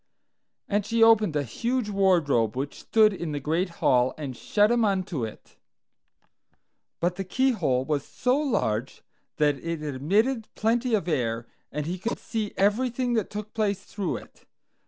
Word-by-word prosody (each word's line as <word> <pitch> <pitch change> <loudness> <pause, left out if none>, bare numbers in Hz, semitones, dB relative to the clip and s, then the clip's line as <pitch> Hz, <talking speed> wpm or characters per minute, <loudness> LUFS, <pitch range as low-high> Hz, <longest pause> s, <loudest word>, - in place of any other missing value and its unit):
And 205 0 +1
she 225 +2 +2
opened 215 -7 +5
a 145 - +1
huge 235 - -2
wardrobe 170 - +2
which 140 +2 -4
stood 215 -2 +4
in 170 -5 -4
the 145 - -2
great 165 +6 0 0.2
hall, 125 0 +3
and 140 -5 -5
shut 210 - +2
him 240 -1 +3
unto 185 - 0
it. 110 - -8 1.4
But 175 +1 0
the 195 - -2
keyhole 190 - +1
was 145 -1 -1
so 250 0 0
large 135 - -1 0.3
that 145 -2 +2
it 165 -2 -3
admitted 205 - 0
plenty 230 +2 +1
of 195 -5 -2
air, 120 -7 -1 0.3
and 150 -1 -3
he 180 +3 -3
could 230 +6 -2
see 215 -3 -3
everything 240 +5 +1
that 220 -4 0
took 210 +1 -6
place 200 -3 -1
through 200 -5 -3
it. - - -15
195 Hz, 155 wpm, -26 LUFS, 145-225 Hz, 1.4 s, opened